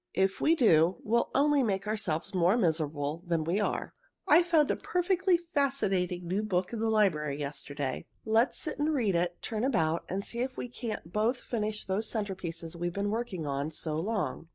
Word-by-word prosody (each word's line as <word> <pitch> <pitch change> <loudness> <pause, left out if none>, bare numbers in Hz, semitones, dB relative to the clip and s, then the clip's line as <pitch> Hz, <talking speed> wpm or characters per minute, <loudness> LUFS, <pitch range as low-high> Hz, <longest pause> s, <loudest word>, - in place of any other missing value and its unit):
If 190 0 +1
we 325 - +4
do, 175 - +4
we'll 235 +2 +1
only 290 0 +4
make 200 -5 0
ourselves 200 -4 -2
more 185 +4 +3
miserable 155 -5 0
than 165 -2 +1
we 170 +6 0
are. 205 - -2 0.3
I 320 +4 +7
found 330 -4 +3
a - - +1
perfectly 360 0 +1 0.2
fascinating 190 -11 0
new 190 +4 0
book 185 -2 -1
in 230 - -3
the 225 0 +1
library 160 -10 +2
yesterday. 140 -1 -4 0.2
Let's 225 +3 +2
sit 310 -3 -5
and 305 +1 +1
read 220 -8 +1
it, 175 0 0
turn 220 -1 -2
about, 170 -11 +1
and 195 +2 -2
see 235 - -5
if 255 +1 -2
we 245 - -4
can't 220 -8 -6
both 225 +4 +2
finish 215 -3 -3
those 200 +3 -1
centerpieces 175 -6 -4
we've 175 +1 -2
been 200 +1 -1
working 220 -8 -3
on 140 +1 -2
so 155 0 -4
long. 180 - -2
200 Hz, 185 wpm, -30 LUFS, 170-235 Hz, 0.3 s, I